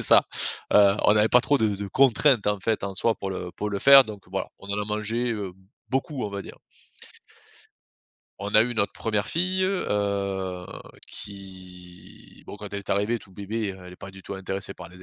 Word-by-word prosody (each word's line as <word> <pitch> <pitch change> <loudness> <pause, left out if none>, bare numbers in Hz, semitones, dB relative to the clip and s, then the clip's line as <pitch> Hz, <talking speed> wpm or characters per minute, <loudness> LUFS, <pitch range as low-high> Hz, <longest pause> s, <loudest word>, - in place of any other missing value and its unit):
c'est - - -2
ça! - - +8 0.5
Heu, 100 -1 +6
on 105 - +6
avait 105 +1 +4
pas 125 0 +5
trop 145 - +3
de 110 -4 +1
de 100 +1 -4
contraintes 130 -1 +4
en 105 0 +1
fait 110 -1 0
en 100 - -4
soi 110 +4 +1
pour 95 - -5
le 90 -1 -5
pour 105 - -4
le 100 - -2
faire 135 +2 +9
donc 105 -4 -9
voilà. 95 - -2
On 100 - -12
en 105 +1 -1
a - - -2
mangé, 110 +3 -1
heu, 100 -4 -4 0.4
beaucoup 135 -1 -1
on 105 - -4
va 100 - -4
dire. - - -11 1.8
On 100 +1 -5
a 110 - +9
eu 120 +1 -2
notre 100 -2 +1
première 105 -2 -1
fille, 185 +3 0
heu, 100 - -1 0.4
qui 95 -3 -6
bon - - -8
quand 105 -1 -9
elle 100 - -2
est 100 - -8
arrivée 105 +4 +1
toute 95 -3 -18
bébé, 100 +1 -3
heu, 95 - -12
elle 90 - -10
est - - -12
pas 95 - -9
du 95 0 -13
tout - - -6
intéressée 95 0 -5
par - - -10
les 90 +1 -14
100 Hz, 215 wpm, -25 LUFS, 95-115 Hz, 1.8 s, faire